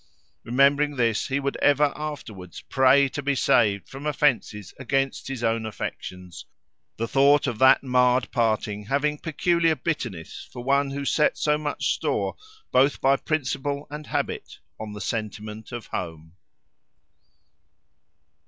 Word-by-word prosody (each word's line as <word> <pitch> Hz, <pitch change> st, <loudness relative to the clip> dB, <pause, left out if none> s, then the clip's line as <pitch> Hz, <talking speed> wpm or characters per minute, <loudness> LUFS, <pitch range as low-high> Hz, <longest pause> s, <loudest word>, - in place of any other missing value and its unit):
Remembering 140 Hz, +4 st, +3 dB
this 115 Hz, -4 st, +1 dB
he 140 Hz, 0 st, 0 dB
would 140 Hz, 0 st, -2 dB
ever 145 Hz, 0 st, +3 dB
afterwards 120 Hz, -, -7 dB
pray 135 Hz, +1 st, +4 dB
to 145 Hz, -, -5 dB
be 140 Hz, 0 st, 0 dB
saved 100 Hz, -5 st, +2 dB
from 140 Hz, +3 st, -7 dB
offences 125 Hz, -, 0 dB
against 135 Hz, +1 st, -1 dB
his 135 Hz, -3 st, -5 dB
own 115 Hz, 0 st, +1 dB
affections; 90 Hz, -5 st, -7 dB, 0.5 s
the 115 Hz, -, -2 dB
thought 140 Hz, +3 st, +4 dB
of 120 Hz, -5 st, -3 dB
that 130 Hz, +1 st, +6 dB
marred 125 Hz, -1 st, +2 dB
parting 110 Hz, -3 st, 0 dB
having 145 Hz, +4 st, 0 dB
peculiar 165 Hz, 0 st, +1 dB
bitterness 120 Hz, -, -5 dB
for 120 Hz, -, -8 dB
one, 140 Hz, +2 st, +2 dB
who 140 Hz, +1 st, -4 dB
set 150 Hz, +2 st, +2 dB
so 150 Hz, 0 st, +2 dB
much 150 Hz, -1 st, -1 dB
store, -, -, -1 dB, 0.4 s
both 135 Hz, +3 st, +3 dB
by 135 Hz, +1 st, +4 dB
principle 140 Hz, -1 st, -2 dB
and 150 Hz, 0 st, -7 dB
habit, -, -, -3 dB, 0.2 s
on 110 Hz, -1 st, -6 dB
the 105 Hz, -, -7 dB
sentiment 110 Hz, 0 st, -5 dB
of 120 Hz, -2 st, -6 dB
home. 80 Hz, -2 st, -6 dB
135 Hz, 135 wpm, -25 LUFS, 110-145 Hz, 0.5 s, that